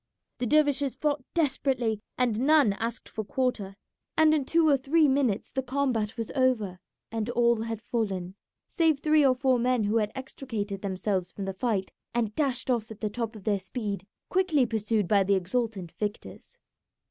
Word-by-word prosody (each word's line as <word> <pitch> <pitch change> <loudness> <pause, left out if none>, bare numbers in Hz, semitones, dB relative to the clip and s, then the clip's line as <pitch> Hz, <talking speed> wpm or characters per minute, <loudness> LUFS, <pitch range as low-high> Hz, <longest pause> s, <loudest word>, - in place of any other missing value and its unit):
The 245 - -1
dervishes 285 -1 +2
fought 290 -3 -1
desperately, 265 -8 +1 0.2
and 240 -4 +1
none 285 -5 +4
asked 230 +3 -4
for 220 - -5
quarter, 210 -4 -2 0.4
and 315 -1 +6
in 295 -3 +1
two 330 +3 +3
or 290 - +6
three 290 +4 +3
minutes 265 -6 +1
the 265 - -1
combat 250 -5 -1
was 230 -2 -4
over 235 -9 +1 0.3
and 225 0 -2
all 235 -1 +2
had 225 -1 -3
fallen, 195 -6 -2 0.3
save 320 -5 +2
three 305 0 +4
or 260 -2 +4
four 255 -1 +2
men 250 -1 +2
who 210 +2 +1
had 210 -2 0
extricated 225 -7 -5
themselves 190 -1 -1
from 200 - -6
the 195 - -3
fight 195 -2 -1 0.2
and 225 -3 0
dashed 265 -3 0
off 230 -3 -1
at 220 -1 -10
the 215 -2 -1
top 230 0 -3
of 210 - -10
their 205 -1 +1
speed, 200 -1 -5 0.2
quickly 360 -8 +2
pursued 220 -3 0
by 200 0 +4
the 195 +1 +2
exultant 190 -1 -2
victors. 210 - -6
235 Hz, 175 wpm, -28 LUFS, 210-270 Hz, 0.4 s, and